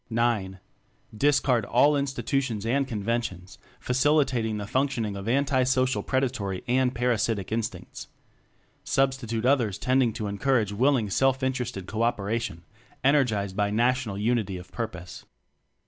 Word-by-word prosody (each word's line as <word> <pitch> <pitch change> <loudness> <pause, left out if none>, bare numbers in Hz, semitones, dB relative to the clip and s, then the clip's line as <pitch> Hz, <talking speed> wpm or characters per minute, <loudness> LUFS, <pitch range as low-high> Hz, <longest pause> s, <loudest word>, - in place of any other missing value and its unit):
(IX) 115 -5 0 0.6
Discard 135 -2 +2
all 145 +8 +3
institutions 135 -5 -1
and 135 +4 +1
conventions 105 -5 -3 0.2
facilitating 130 -4 +1
the 105 - -4
function 130 0 0
ing 105 -1 -4
of 100 +1 -6
anti 135 +2 +2
social 130 0 +1
predatory 120 -8 -2
and 125 0 +1
para 120 0 +1
sitic 105 -3 -2
instincts; 115 0 -4 0.8
Substitute 130 -4 0
others 120 -8 +2
tending 130 +1 +2
to 110 -2 -4
en 100 0 -5
courage 115 -4 +2
willing 120 -2 +2
self 135 +4 +2
interested 125 -7 -2
co 110 +3 -4
operation 115 -5 -1 0.4
energized 115 -9 +2
by 105 0 +1
national 120 -1 0
unity 105 -3 0
of 90 0 -12
purpose. 90 -7 -6
120 Hz, 130 wpm, -26 LUFS, 105-130 Hz, 0.8 s, all